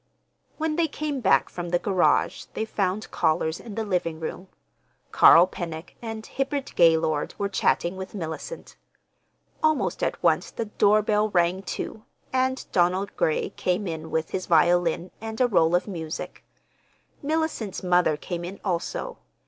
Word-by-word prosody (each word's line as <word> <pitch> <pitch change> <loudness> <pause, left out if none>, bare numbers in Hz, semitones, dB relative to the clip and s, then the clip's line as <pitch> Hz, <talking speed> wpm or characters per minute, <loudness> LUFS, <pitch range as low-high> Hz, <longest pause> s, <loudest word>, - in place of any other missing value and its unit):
When 315 0 -1
they 335 -1 +3
came 295 -1 -3
back 195 -4 +4
from 175 -1 -6
the 175 - +2
garage 185 0 +1
they 220 - -1
found 200 -1 -2
callers 160 0 0
in 220 -4 -9
the 225 - -1
living 175 -5 -1
room. 170 +3 -6 0.6
Carl 170 +2 +8
Pennock 170 -2 -7
and 225 -1 -6
Hibbard 275 0 -3
Gaylord 160 -3 +3
were 200 - -1
chatting 190 -2 0
with 190 +2 -7
Mellicent. 175 - -6 0.8
Almost 310 -1 +1
at - - -2
once - - +2
the 230 - -4
doorbell 210 0 +2
rang, 180 0 +2
too, 205 +3 -5 0.3
and 260 0 0
Donald 185 +2 +1
Gray 155 - 0
came 185 +1 -1
in 160 -2 -5
with 160 0 -2
his 185 - -3
violin 175 +1 +3
and 220 0 -6
a 255 - +5
roll 175 -6 +3
of 180 - 0
music. 165 -5 -6 0.8
Mellicent's 300 - -2
mother 180 -4 +3
came 175 +2 -5
in 185 +3 -7
also. 175 - -3
185 Hz, 150 wpm, -25 LUFS, 170-220 Hz, 0.8 s, Carl